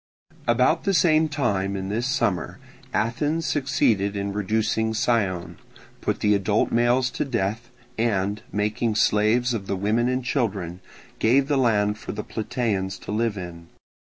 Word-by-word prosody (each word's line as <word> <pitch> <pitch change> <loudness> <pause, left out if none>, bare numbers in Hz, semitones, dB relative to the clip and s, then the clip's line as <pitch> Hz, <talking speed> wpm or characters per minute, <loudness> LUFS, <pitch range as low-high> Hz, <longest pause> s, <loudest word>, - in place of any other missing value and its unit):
About 125 +7 +3
the 195 -1 +1
same 160 -2 +4
time 100 -10 -1
in 95 0 -4
this 115 +4 -1
summer 95 - -1 0.3
Athens 145 +9 0
succeeded 110 -9 +1
in 100 0 -2
reducing 110 +2 0
Scione, 105 -7 0 0.4
put - - -2
the 105 - +4
adult 100 +1 +1
males 120 +2 +2
to - - -2
death, 115 -2 -2 0.3
and, 105 -3 0
making 105 +2 0
slaves 110 +4 +3
of 100 -4 -4
the - - -1
women 110 +5 +1
and 130 0 -1
children, 100 - -2 0.4
gave 135 +5 +3
the 145 - +1
land 105 -5 +2
for - - -6
the 105 0 -4
Plataeans 105 -5 -2
to - - -7
live 110 0 0
in. 85 -2 -8
110 Hz, 150 wpm, -24 LUFS, 100-125 Hz, 0.4 s, same